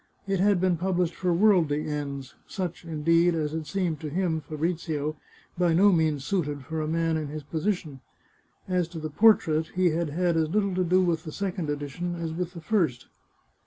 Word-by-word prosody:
It 195 -1 0
had 200 -1 +3
been 180 -1 +2
published 180 -1 0
for 180 -1 -1
worldly 170 -6 +3
ends 140 -3 -4
— - - -37
such, 180 -3 -5
in 155 -2 -5
deed, 165 +1 +4
as 155 -2 -1
had 160 -1 -4
seemed 170 -2 -1
to 155 - -5
him 165 0 0
(Fabrizio), 155 0 -2 0.4
by 175 -2 +3
no 200 +4 +6
means 155 -5 +1
suited 150 -8 -1
for 160 +2 -3
a 155 - -2
man 165 0 +1
in 155 -2 -3
his 150 +1 -6
position. 155 -3 -3 0.7
As 180 -2 +1
to 170 -1 -8
the 155 -1 -5
portrait, 160 -5 +4
he 180 -2 +3
had 165 0 -1
had 170 +2 +1
as 160 -1 +1
little 200 +1 +1
to 185 0 +1
do 185 +2 +3
with 165 -3 0
the 155 - -7
second 185 -3 -3
edition 145 +5 -3
as 165 -2 -4
with 180 +1 -3
the 170 - -8
first. 160 - 0
165 Hz, 200 wpm, -27 LUFS, 155-180 Hz, 0.7 s, no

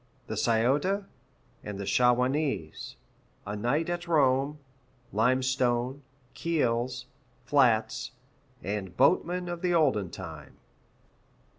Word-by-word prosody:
The - - -5
Scioto, 140 - +1 0.6
and 105 -1 -6
the 100 - -4
Shawanese 125 - +1 0.5
A 105 - -4
night 125 +10 0
at 175 0 -3
Rome 140 -2 +2 0.6
Limestone 125 +2 +1 0.3
Keels, 125 -6 -1 0.4
flats, 120 -5 +2 0.5
and 95 -2 -4
boatmen 175 +5 +2
of 175 -1 -5
the 180 -2 +1
olden 130 - +2
time. 80 -6 -9
130 Hz, 95 wpm, -28 LUFS, 110-150 Hz, 0.6 s, Rome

